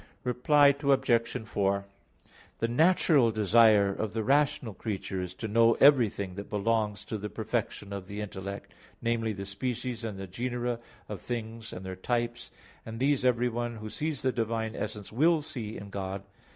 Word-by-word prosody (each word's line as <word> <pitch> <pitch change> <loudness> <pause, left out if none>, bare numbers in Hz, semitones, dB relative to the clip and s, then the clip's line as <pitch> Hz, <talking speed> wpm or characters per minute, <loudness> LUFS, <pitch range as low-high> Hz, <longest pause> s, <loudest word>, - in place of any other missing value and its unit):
Reply 140 +4 +4
Obj. 130 -5 +2
4: 100 -1 0 0.7
The 115 - 0
natural 150 -1 +4
desire 105 -2 +5
of 105 +1 -3
the 110 -1 -1
rational 135 -3 +2
creature 95 -2 -4
is 90 0 -6
to 110 - -5
know 115 +2 +5
everything 115 -9 +4
that 100 +2 -7
belongs 105 0 0
to 110 - -4
the 105 +1 -5
perfection 100 +1 -3
of 95 -2 -6
the 100 +2 -6
intellect, 100 -1 -6 0.3
namely, 115 -1 0
the 100 -1 -5
species 120 +4 -3
and 110 -4 -4
the 95 - -5
genera 120 +4 -3 0.3
of - - -6
things 115 -2 -5
and 90 - -8
their 95 0 -5
types, 120 +4 -2 0.3
and 115 0 -7
these 135 0 +2
everyone 120 -1 +1
who 110 -1 -7
sees 155 -2 -3
the 130 - +2
Divine 115 -2 -2
essence 105 -1 -5
will 155 +6 +3
see 120 -8 -5
in 100 0 -9
God. 95 0 -4
115 Hz, 165 wpm, -29 LUFS, 100-125 Hz, 0.7 s, desire